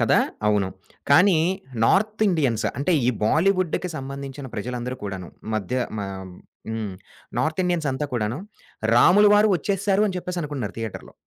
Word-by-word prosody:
కదా! -, -, +4 dB, 0.3 s
అవును. 105 Hz, -3 st, +2 dB, 0.4 s
కానీ, 180 Hz, +5 st, +6 dB, 0.5 s
నార్త్ 215 Hz, -, +2 dB
ఇండియన్స్ 135 Hz, -, +1 dB
అంటే, 160 Hz, +6 st, +1 dB
ఈ -, -, +3 dB, 0.2 s
బాలీవుడ్డుకి 185 Hz, -, +2 dB
సంబంధించిన 135 Hz, 0 st, -6 dB
ప్రజలందరూ 125 Hz, +3 st, -4 dB
కూడాను 95 Hz, -3 st, -5 dB, 0.3 s
మధ్య 110 Hz, +4 st, -2 dB, 0.2 s
మ -, -, -1 dB, 0.7 s
హ్మ్. 110 Hz, -3 st, -3 dB, 0.5 s
నార్త్ 160 Hz, +3 st, 0 dB
ఇండియన్స్ 175 Hz, -4 st, 0 dB
అంతా 145 Hz, +3 st, -2 dB
కూడాను, 115 Hz, +2 st, -1 dB, 0.6 s
రాములవారు 205 Hz, -, +6 dB
ఒచ్చేసారు 195 Hz, +4 st, +1 dB
అని 185 Hz, -, -4 dB
చెప్పేసి 180 Hz, 0 st, -4 dB
అనుకున్నారు 135 Hz, -8 st, -4 dB
థియేటర్‌లో. 115 Hz, -3 st, -6 dB
145 Hz, 130 wpm, -24 LUFS, 115-185 Hz, 0.7 s, కానీ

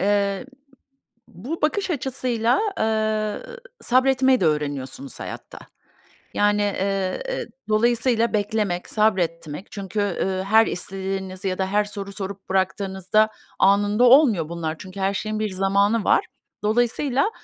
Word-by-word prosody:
Eee, 200 Hz, +3 st, +1 dB, 0.8 s
bu 260 Hz, -, -7 dB
bakış 380 Hz, +6 st, 0 dB
açısıyla, 255 Hz, -, 0 dB, 0.2 s
eee, 220 Hz, -, -1 dB, 0.2 s
sabretmeyi 260 Hz, +1 st, +3 dB
de 175 Hz, -, +3 dB
öğreniyorsunuz 150 Hz, -, -3 dB
hayatta. -, -, -8 dB, 0.8 s
Yani, 205 Hz, 0 st, +2 dB
eee, 195 Hz, -, -1 dB
eee, -, -, -3 dB, 0.2 s
dolayısıyla 235 Hz, +1 st, +2 dB
beklemek, 205 Hz, -4 st, -1 dB
sabretmek 175 Hz, -6 st, 0 dB
çünkü, 200 Hz, 0 st, -4 dB
eee, 190 Hz, -1 st, -1 dB
her 220 Hz, +3 st, +5 dB
istediğinizi 190 Hz, +1 st, -4 dB
ya 185 Hz, -, -2 dB
da 190 Hz, -, 0 dB
her 205 Hz, +2 st, +1 dB
soru 200 Hz, -1 st, -7 dB
sorup 195 Hz, 0 st, -7 dB
bıraktığınızda 190 Hz, +2 st, +1 dB, 0.3 s
anında 205 Hz, +4 st, +4 dB
olmuyor 240 Hz, -, +5 dB
bunlar. 165 Hz, -2 st, -3 dB
Çünkü 190 Hz, +1 st, -9 dB
her 195 Hz, +1 st, +1 dB
şeyin 215 Hz, +2 st, -3 dB
bir 215 Hz, -1 st, -1 dB
zamanı 200 Hz, +3 st, +1 dB
var. -, -, +3 dB, 0.4 s
Dolayısıyla 245 Hz, -, +1 dB
205 Hz, 120 wpm, -23 LUFS, 190-230 Hz, 0.8 s, her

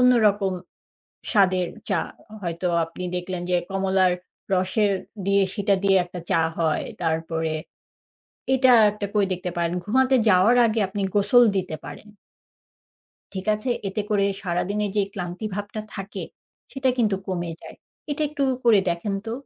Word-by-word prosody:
অন্যরকম 215 Hz, -6 st, +4 dB, 0.8 s
স্বাদের 185 Hz, -5 st, +3 dB, 0.2 s
চা। -, -, +2 dB, 0.3 s
হ 215 Hz, -, -22 dB
হয়তো 175 Hz, 0 st, -2 dB, 0.2 s
আপনি 165 Hz, +2 st, -9 dB
দেখলেন 180 Hz, 0 st, -4 dB
যে, 180 Hz, -, +4 dB, 0.2 s
কমলার 190 Hz, -1 st, +2 dB, 0.4 s
রসের 190 Hz, +3 st, +2 dB, 0.3 s
দিয়ে 200 Hz, 0 st, +3 dB
সেটা 200 Hz, -1 st, +2 dB
দিয়ে 195 Hz, -1 st, +5 dB
একটা 180 Hz, 0 st, -8 dB
চা -, -, +4 dB, 0.2 s
হয়। 160 Hz, -2 st, +1 dB, 0.2 s
তারপরে 160 Hz, -1 st, -1 dB, 1.0 s
এটা 260 Hz, 0 st, +5 dB, 0.2 s
একটা 205 Hz, 0 st, -4 dB
করে 205 Hz, -2 st, +3 dB
দেখতে 180 Hz, 0 st, -3 dB
পারেন, 170 Hz, 0 st, 0 dB
ঘুমাতে 260 Hz, +5 st, +3 dB
যাওয়ার 190 Hz, +7 st, +5 dB
আগে 220 Hz, 0 st, 0 dB
আপনি 200 Hz, +1 st, -3 dB
গোসল 205 Hz, +4 st, +5 dB
দিতে 180 Hz, -4 st, -3 dB
পারেন। 215 Hz, -, -10 dB, 1.3 s
ঠিক 190 Hz, +1 st, -5 dB
আছে? 215 Hz, +4 st, -3 dB, 0.2 s
এতে 195 Hz, +2 st, -3 dB
করে 200 Hz, -1 st, +3 dB, 0.2 s
সারাদিনের 200 Hz, +3 st, -1 dB
যে 205 Hz, -, +4 dB
ক্লান্তি 180 Hz, +2 st, -5 dB
ভাবটা 205 Hz, +1 st, -4 dB
থাকে, 195 Hz, +1 st, -6 dB, 0.5 s
সেটা 265 Hz, -1 st, 0 dB
কিন্তু 210 Hz, -4 st, +2 dB
কমে 175 Hz, -2 st, -3 dB
যায়। -, -, -11 dB, 0.3 s
এটা 290 Hz, +2 st, -1 dB
একটু 290 Hz, -1 st, -3 dB, 0.2 s
করে 220 Hz, -4 st, +6 dB
দেখেন 170 Hz, +4 st, -2 dB
তো। 225 Hz, -, -3 dB
195 Hz, 145 wpm, -24 LUFS, 180-210 Hz, 1.3 s, করে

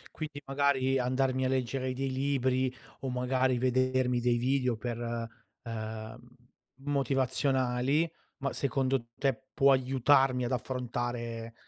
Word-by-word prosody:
Quindi 150 Hz, -2 st, -6 dB
magari, 135 Hz, -1 st, +2 dB
andarmi 130 Hz, +1 st, +1 dB
a -, -, +2 dB
leggere 130 Hz, 0 st, -1 dB
dei 135 Hz, +1 st, -2 dB
libri 130 Hz, -1 st, +1 dB, 0.3 s
o 135 Hz, -, -3 dB
magari 125 Hz, 0 st, +1 dB
vedermi 130 Hz, 0 st, +2 dB
dei 120 Hz, 0 st, +2 dB
video 125 Hz, 0 st, +1 dB
per 120 Hz, +1 st, -4 dB, 0.6 s
ehm, 110 Hz, -1 st, -6 dB, 0.7 s
motivazionali, 135 Hz, +1 st, +1 dB, 0.3 s
ma 140 Hz, 0 st, -2 dB
secondo 135 Hz, -2 st, 0 dB
te, 135 Hz, 0 st, -1 dB
può 140 Hz, 0 st, +5 dB
aiutarmi 130 Hz, 0 st, +3 dB
ad 120 Hz, -, -2 dB
affrontare 120 Hz, -2 st, -3 dB
130 Hz, 115 wpm, -30 LUFS, 125-135 Hz, 0.7 s, può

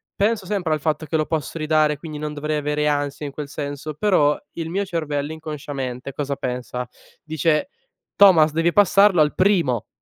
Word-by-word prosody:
penso 205 Hz, -2 st, 0 dB
sempre 185 Hz, -6 st, -1 dB
al 155 Hz, -, -1 dB
fatto 155 Hz, +1 st, -1 dB
che 160 Hz, -, -3 dB
lo 155 Hz, -, 0 dB
posso 160 Hz, 0 st, -3 dB
ridare 155 Hz, -1 st, +2 dB
quindi 155 Hz, -1 st, -8 dB
non 150 Hz, 0 st, -4 dB
dovrei 150 Hz, +1 st, -2 dB
avere 150 Hz, 0 st, -1 dB
ansia 145 Hz, 0 st, -1 dB
in -, -, -7 dB
quel 145 Hz, +1 st, -6 dB
senso, 145 Hz, +1 st, -5 dB
però 150 Hz, -4 st, +3 dB, 0.2 s
il 165 Hz, -1 st, -5 dB
mio 200 Hz, +2 st, -1 dB
cervello, 150 Hz, -4 st, -3 dB
inconsciamente 140 Hz, -4 st, -6 dB
cosa 140 Hz, 0 st, -3 dB
pensa? 125 Hz, -1 st, -4 dB, 0.4 s
Dice: 155 Hz, -, 0 dB, 0.5 s
"Thomas 170 Hz, -6 st, +6 dB
devi 165 Hz, +2 st, +1 dB
passarlo 200 Hz, -3 st, +5 dB
al 150 Hz, -, +2 dB
primo, 165 Hz, -, +2 dB
155 Hz, 175 wpm, -22 LUFS, 145-165 Hz, 0.5 s, Thomas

